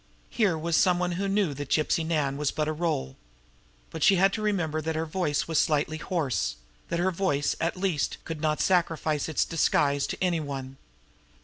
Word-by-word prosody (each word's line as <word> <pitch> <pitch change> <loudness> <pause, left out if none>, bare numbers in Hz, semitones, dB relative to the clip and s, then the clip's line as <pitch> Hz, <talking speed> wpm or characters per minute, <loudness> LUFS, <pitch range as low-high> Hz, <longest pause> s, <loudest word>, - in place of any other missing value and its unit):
Here 200 -8 +2
was 165 +1 -1
some 180 +1 +4
one 180 0 -1
who 190 +3 -2
knew 195 -5 +1
that 145 0 -6
Gypsy 155 +1 +1
Nan 150 -4 0
was 145 0 0
but 150 -1 -2
a 155 - 0
role. 150 - -2 0.7
But 160 - -6
she 195 - +6
had 195 +2 +3
to 220 - -2
remember 175 -7 0
that 160 +1 -2
her 160 +1 -1
voice 155 -3 -1
was 160 -2 +1
slightly 155 +1 +1
hoarse; 140 - -1 0.3
that 170 - -1
her 185 +2 +2
voice, 165 -6 0
at 165 +2 -1
least, 180 -6 -1
could 160 -2 -5
not 155 -1 0
sacrifice 165 -4 +1
its 155 - +1
disguise 145 -3 +1
to - - -4
any 180 -3 +1
one. 135 -3 -6
160 Hz, 195 wpm, -27 LUFS, 150-180 Hz, 0.7 s, she